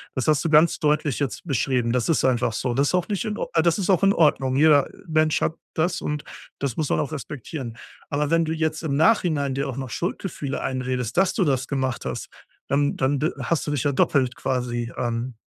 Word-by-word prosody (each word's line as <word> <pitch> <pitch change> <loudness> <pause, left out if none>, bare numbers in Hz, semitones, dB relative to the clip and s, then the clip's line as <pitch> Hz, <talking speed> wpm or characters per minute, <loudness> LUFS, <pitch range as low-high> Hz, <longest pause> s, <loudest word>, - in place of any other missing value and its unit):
Das 130 - -2
hast 150 -2 +3
du 165 - 0
ganz 155 +2 +5
deutlich 150 -3 +1
jetzt 140 -5 -3
beschrieben. 125 -4 0
Das 125 +4 0
ist 160 - +2
einfach 120 -3 +1
so. 125 +1 -1
Das 140 +3 +2
ist - - +1
auch 180 - 0
nicht 205 +3 -1
in 215 -1 -3
Or - - -3
äh, 165 - +4
das 170 0 +2
ist 195 -2 -2
auch 190 0 +3
in 195 - +5
Ordnung. 135 -6 +2
Jeder 145 -1 +5 0.2
Mensch 155 -1 +2
hat 160 - +1 0.2
das, 170 +2 0
und 150 0 -3 0.4
das 140 -4 -2
muss 155 -3 -1
man - - +1
auch 150 - -2
respektieren. 135 -4 -6 0.3
Aber 145 0 0
wenn 165 0 +3
du 160 - -2
jetzt 160 0 -1
im 140 -3 -1
Nachhinein 155 -7 +2
dir 140 +1 -2
auch 130 - -5
noch 130 -2 -4
Schuldgefühle 160 - -3
einredest, 130 -1 -2
dass 190 -1 +3
du 195 - +1
das 135 -4 0
gemacht 130 -3 -2
hast, - - -4 0.4
dann 145 +1 +1
dann 135 +1 +1
d 155 - +1
hast 165 -3 -1
du - - -1
dich 145 -5 -1
ja 145 - +2
doppelt 130 -1 +2
quasi 125 -2 -2
ähm, 120 0 -2
145 Hz, 230 wpm, -24 LUFS, 130-160 Hz, 0.4 s, ganz